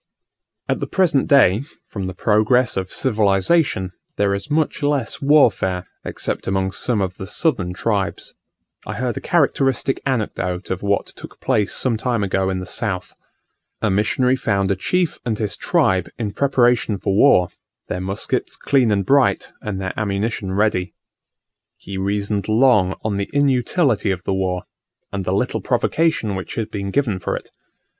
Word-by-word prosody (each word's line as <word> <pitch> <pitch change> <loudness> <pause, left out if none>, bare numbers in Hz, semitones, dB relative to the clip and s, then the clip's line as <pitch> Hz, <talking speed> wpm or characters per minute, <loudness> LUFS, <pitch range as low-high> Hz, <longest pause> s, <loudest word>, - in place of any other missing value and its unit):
At - - 0
the - - -3
present 170 -8 +2
day, 130 -5 +5 0.2
from 95 -3 -5
the 95 - -6
progress 110 +5 +2
of 95 -1 -3
civilization, 105 - +1 0.3
there 100 -1 +2
is 100 +8 -4
much 155 +1 0
less 145 -5 -1
warfare, 115 -11 +3 0.2
except - - -4
among 95 0 0
some 110 +2 0
of 95 -1 -3
the 95 - -7
southern 100 - 0
tribes. 95 -5 -2 0.5
I - - -4
heard 125 -1 -2
a - - -5
characteristic 135 -5 +1
anecdote 100 -8 -2
of 95 - -2
what 100 0 0
took - - -12
place 105 -2 +1
some 120 -4 +1
time 115 -2 -1
ago 95 -1 0
in 95 - -1
the 90 - -5
south. 90 0 -3 0.7
A 110 - +2
missionary 125 +6 +2
found 100 -6 0
a - - +2
chief 180 - -1
and 115 -3 -2
his 105 -2 -2
tribe 95 -2 +1
in 110 -4 -3
preparation 120 -6 +2
for 100 +1 -1
war; 100 -7 +5 0.4
their 90 - -3
muskets 95 +2 -2
clean 130 -5 +2
and 100 -2 +1
bright, 140 +3 +2
and 100 -3 -4
their 95 -1 -3
ammunition 100 -1 -2
ready. 95 -2 0 0.8
He 100 - -8
reasoned 100 +1 -1
long 110 -5 +4
on 105 -2 -1
the 100 - -3
inutility 135 - +2
of 95 -2 -2
the 95 - -1
war, 95 -1 -1 0.5
and 100 -2 -3
the - - -1
little - - 0
provocation 160 -10 +1
which 95 -1 -5
had 110 -1 -3
been 100 -1 -4
given 110 -5 0
for - - -2
it. - - -11
105 Hz, 165 wpm, -20 LUFS, 95-130 Hz, 0.8 s, day